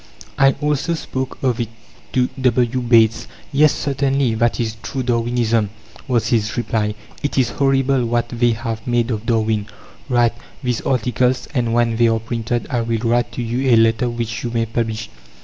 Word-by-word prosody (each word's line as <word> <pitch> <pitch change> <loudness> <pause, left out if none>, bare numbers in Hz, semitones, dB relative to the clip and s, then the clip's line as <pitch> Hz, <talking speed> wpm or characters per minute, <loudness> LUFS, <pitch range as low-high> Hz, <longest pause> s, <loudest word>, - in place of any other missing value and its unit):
I 135 0 +6
also 150 +3 0
spoke 130 -4 -4
of 125 -3 +1
it 115 -2 -2 0.4
to 125 -1 +3
W. 125 0 +2
Bates. 115 -2 +3 0.3
"Yes, 150 +2 +5
certainly; 135 -3 0
that 115 +1 +1
is 110 -2 -2
true 130 - -3
Darwinism," 115 -2 +1 0.4
was 120 -4 +1
his 110 -1 0
reply. 105 -3 -1 0.3
"It 145 - -2
is 125 -3 +3
horrible 135 -2 +2
what 120 0 0
'they' 120 -1 +2
have 115 0 -5
made 120 0 +1
of 110 0 -4
Darwin. 110 -2 +1 0.4
Write 120 -2 +3 0.3
these 125 -2 -1
articles, 125 0 0
and 120 -2 0
when 120 -1 +2
they 120 0 +4
are 115 0 +2
printed, 115 +1 -2
I 120 -3 +1
will 115 0 -1
write 120 +1 +1
to 125 - -3
you 125 +3 -1
a - - +7
letter 115 +2 +3
which 115 -1 -4
you 120 - -2
may 115 -1 0
publish." 110 -1 -2
120 Hz, 175 wpm, -20 LUFS, 115-125 Hz, 0.4 s, a